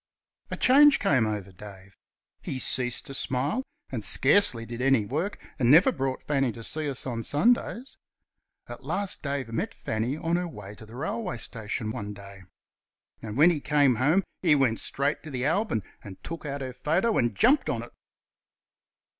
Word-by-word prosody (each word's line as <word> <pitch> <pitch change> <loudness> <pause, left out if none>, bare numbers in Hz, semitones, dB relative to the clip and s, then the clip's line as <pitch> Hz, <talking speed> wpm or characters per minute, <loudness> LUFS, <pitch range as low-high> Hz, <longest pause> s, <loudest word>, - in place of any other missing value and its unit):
A - - -4
change 285 +3 +6
came 130 -6 +2
over 105 -3 -4
Dave. 95 0 -13 0.5
He 135 - -5
ceased 125 -1 -1
to 135 - -8
smile, 135 - -1 0.3
and 120 -5 -4
scarcely 130 - +4
did 120 +1 -7
any 135 -5 +3
work, 160 - -3 0.2
and 120 -2 +2
never 160 +7 +7
brought 135 -1 -3
Fanny 135 -4 0
to 115 - -9
see 150 +4 -2
us 135 - -3
on 120 -3 -3
Sundays. 240 - 0 0.7
At - - -10
last 200 -1 -2
Dave 140 -4 -3
met - - -3
Fanny 115 +6 -3
on 165 +2 0
her 180 0 -2
way 105 -10 -10
to 110 +1 -13
the 115 - -12
railway 185 - -3
station 110 -1 -4
one 105 -3 -5
day, 100 -1 -12 0.8
and 110 +1 -6
when 160 +5 +6
he 155 -4 -3
came 145 -5 +3
home 155 +10 +3 0.2
he 160 -5 +4
went 130 -5 +1
straight 140 +2 -2
to 155 - -9
the 130 -2 -3
album 165 - 0 0.2
and 95 -2 -10
took 165 -2 -7
out 140 0 -4
her 130 -1 -5
photo 185 - +1
and 120 -1 0
jumped 275 +6 +3
on - - -2
it. - - -12
135 Hz, 180 wpm, -27 LUFS, 115-160 Hz, 0.8 s, never